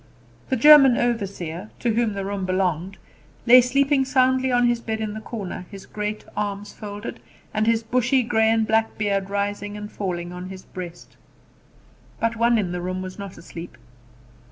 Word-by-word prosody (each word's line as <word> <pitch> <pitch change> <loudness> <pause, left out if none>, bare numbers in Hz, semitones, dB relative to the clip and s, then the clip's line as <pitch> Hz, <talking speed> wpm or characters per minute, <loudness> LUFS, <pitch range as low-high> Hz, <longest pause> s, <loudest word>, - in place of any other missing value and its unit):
The - - +2
German 270 -1 +8
overseer, 200 -6 -2
to 235 -2 0
whom 230 -1 +1
the 195 -1 -4
room 200 -1 -3
belonged, 185 0 -1 0.5
lay 250 +1 +9
sleeping 275 +2 +2
soundly 260 -1 +2
on 245 0 +3
his 240 -1 +1
bed 220 -1 -4
in 215 -1 -3
the 215 - -6
corner, 200 -5 -6
his 195 -2 -10
great 210 0 -4
arms 205 0 -3
folded, 205 -1 -7 0.3
and 215 +1 0
his 230 0 +2
bushy 250 +3 +2
grey 220 -1 +2
and 225 0 +2
black 220 +1 +1
beard 200 -2 -1
rising 205 +1 -2
and 210 0 -7
falling 175 -3 -4
on 180 +1 -7
his 190 -1 -9
breast. 175 -2 -9 1.0
But 230 0 0
one 235 +1 +3
in 190 -5 -1
the 180 0 -3
room 185 +1 -3
was 185 +2 -8
not 200 -2 -8
asleep. 170 0 -10
210 Hz, 175 wpm, -23 LUFS, 190-235 Hz, 1.0 s, lay